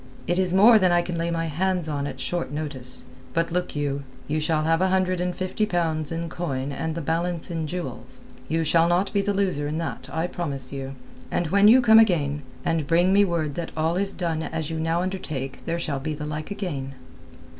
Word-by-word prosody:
"It 175 +1 +1
is 185 -1 +2
more 215 +4 +7
than 185 -2 +3
I 175 0 +3
can 175 - -4
lay 165 0 -1
my 165 -1 -1
hands 175 +2 0
on 145 -2 -2
at 130 -2 -7
short 175 -4 -2
notice. 140 -4 -5 0.3
But, 165 0 +1
look 180 -1 -2
you, 140 -1 -1 0.3
you 155 +1 0
shall 155 0 +1
have 165 +2 +2
a 190 - +4
hundred 185 -1 +1
and 180 0 -1
fifty 185 +3 -1
pounds 160 -5 0
in 165 +1 -2
coin 140 -5 -3
and 160 +3 -3
the 170 - -3
balance 170 +2 -2
in 160 -2 -2
jewels. 130 -7 -6 0.3
You 165 +1 +1
shall 165 +1 +4
not 180 +4 +1
be 200 - +3
the 205 +1 0
loser 190 -8 0
in 150 +2 -2
that, 165 0 -4
I 160 +1 -1
promise 145 -7 -2
you. 135 0 -5 0.3
And 170 -3 -1
when 200 +1 +6
you 250 +4 +8
come 220 -2 +7
again, 150 -9 +2 0.2
and 160 -3 0
bring 175 +4 +4
me 200 +1 +6
word 165 -6 -1
that 170 +2 -4
all 160 +2 +1
is 195 +1 0
done 165 -3 -2
as 160 -1 -3
you 160 - -2
now 165 +2 0
undertake 150 -8 -4
there 170 0 0
shall 155 -5 -2
be 155 +3 -3
the 150 0 -5
like 150 0 -5
again." 145 -10 -4
165 Hz, 220 wpm, -25 LUFS, 150-180 Hz, 0.3 s, you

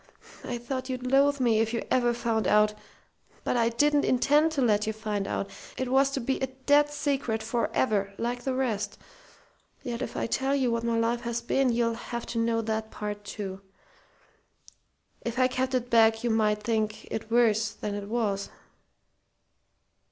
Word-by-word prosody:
I 245 - -3
thought 255 +2 -4
you'd 255 -1 -4
loathe 280 +1 +4
me 235 -4 +3
if 225 +1 0
you 230 - -2
ever 240 -1 +3
found 230 -2 -1
out. 210 0 +4 0.7
But - - 0
I 230 -1 +3
didn't 290 +5 +2
intend 295 +5 +3
to 280 - 0
let 210 -2 +2
you 220 - 0
find 210 -2 -3
out. 200 - -3 0.3
It 260 -1 -2
was 270 +1 +4
to 275 - 0
be 265 +2 -1
a 265 - -1
dead 285 +3 +2
secret 275 -7 -1
forever, 220 -3 0
like 245 +1 -2
the 265 0 -1
rest. 240 -6 -1 0.9
Yet 240 -2 -4
if - - -4
I - - 0
tell 265 +4 0
you 260 -4 +1
what 230 0 -1
my 235 -1 0
life 230 +1 +1
has 235 0 -2
been 260 +1 +2
you'll 230 0 +1
have 235 0 -5
to 230 - -1
know 230 0 +1
that 220 0 -2
part, 205 -1 -5
too. 195 -1 -6 1.6
If 235 +1 -4
I 255 0 +4
kept 260 +1 -1
it 245 -1 -2
back 225 0 +5
you 240 - +1
might 210 -1 +1
think 215 -1 -1
it 220 0 -4
worse 225 -2 +3
than 210 0 -5
it 205 0 -5
was." 210 -4 -1
235 Hz, 180 wpm, -28 LUFS, 220-255 Hz, 1.6 s, back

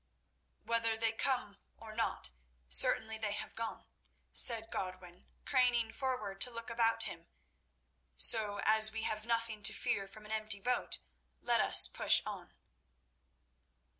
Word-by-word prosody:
"Whether 230 -1 -3
they 225 0 -1
come 235 -3 -3 0.2
or 220 -1 -14
not, 225 - -3 0.4
certainly 220 - +1
they 210 -2 -4
have - - -8
gone," 230 -1 -8 0.5
said 225 -2 +5
Godwin, 185 -2 -10 0.2
craning 245 -4 -1
forward 235 -8 -6
to 250 - +6
look 230 0 -9
about 230 -1 -1
him; - - -9 0.9
"so, 210 -3 +6
as 220 0 +5
we 225 0 -6
have 215 +1 -5
nothing 230 -2 -4
to - - +5
fear 195 -1 -4
from 210 +2 -14
an 215 - -12
empty 215 -1 -1
boat, 250 +5 -2 0.4
let - - -1
us - - +7
push - - +2
on." - - -11
220 Hz, 135 wpm, -31 LUFS, 210-230 Hz, 0.9 s, us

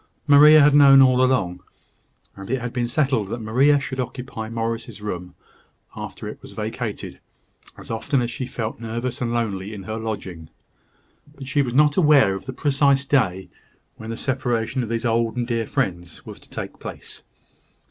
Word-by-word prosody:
Maria 150 +1 +8
had 145 0 +5
known 140 -2 +8
all 130 -1 +5
along; 95 -9 0 0.7
and 95 0 -10
it 130 +1 0
had 120 0 -5
been 120 -1 -1
settled 130 -5 0
that 115 - -4
Maria 130 +7 +3
should 135 -1 -6
occupy 125 -3 -5
Morris's 115 -1 -4
room, 90 -4 -6 0.6
after - - -7
it - - -8
was - - -12
vacated, - - -5 0.6
as - - -10
often 130 +5 0
as 120 -1 -2
she 125 +1 -5
felt 115 -3 -5
nervous 120 +2 -4
and 120 -1 -1
lonely 105 -3 -3
in 100 - -8
her 110 +3 -5
lodging. 95 -8 -6 0.9
But 135 -3 -10
she 140 +2 +1
was 125 -3 -3
not 150 +1 +4
aware 150 - +5
of 95 - -7
the - - -3
precise 140 -1 +2
day 95 -10 0 0.5
when 110 - -9
the 115 - -4
separation 125 -2 -1
of 115 - -4
these 115 +1 -2
old 115 +1 0
and 120 - 0
dear 115 -2 -2
friends 85 -2 -3
was - - -10
to - - -20
take - - -7
place. - - -9
120 Hz, 180 wpm, -22 LUFS, 110-135 Hz, 0.9 s, Maria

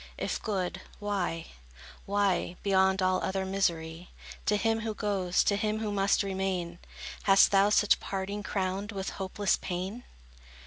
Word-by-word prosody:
If - - -2
good, 190 -3 -2 0.2
why, 190 -5 -2 0.6
why, 200 -3 +1
Beyond 190 -1 +3
all 185 0 +2
other 190 0 -1
misery, 170 -3 -1 0.4
To 210 - +3
him 225 +1 +1
who 220 -1 -3
goes, 190 -4 +1
to 200 - +2
him 215 +1 0
who 215 -1 -2
must 200 0 +2
remain, 190 -3 -2 0.5
Hast 195 -1 +6
thou 200 +1 +5
such 210 0 +4
parting 195 +1 -4
crowned 195 +1 -2
with 195 -2 -4
hopeless 195 +1 0
pain? 190 +6 -4
195 Hz, 140 wpm, -29 LUFS, 185-205 Hz, 0.6 s, Hast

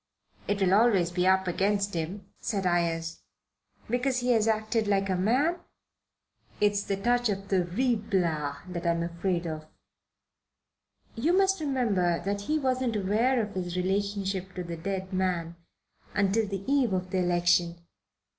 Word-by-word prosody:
"It 205 0 0
will 190 -1 +3
always 200 -5 +4
be 180 +1 +1
up 190 0 +3
against 200 +2 0
him," 175 +4 -4
said 195 -4 -2
Ayres. 165 -2 0 0.7
"Because 250 +2 0
he 250 0 +1
has 225 -2 +3
acted 220 0 0
like 195 -1 +1
a - - +1
man?" 255 - +2 1.0
"It's 205 -1 +2
the 200 -1 -2
touch 240 +3 +1
of 195 -1 -3
Ruy 195 +7 +1
Blas 170 -9 -1
that 175 -1 -4
I'm 170 0 +1
afraid 175 +1 -2
of." 155 -1 -5 1.5
"You 320 +11 +1
must 385 -2 +3
remember 210 - +1
that 200 0 -1
he 305 +10 0
wasn't 255 -4 0
aware 215 +6 +2
of 205 -1 -6
his 180 -1 -3
relation 200 +2 0
to 190 -1 -3
the 170 -1 -5
dead 190 +3 -4
man 175 -3 -1 0.6
until 205 +2 +2
the 195 -1 -4
eve 270 -6 +2
of 185 0 -2
the 190 - +1
election." 175 -1 +1
195 Hz, 150 wpm, -28 LUFS, 175-220 Hz, 1.5 s, always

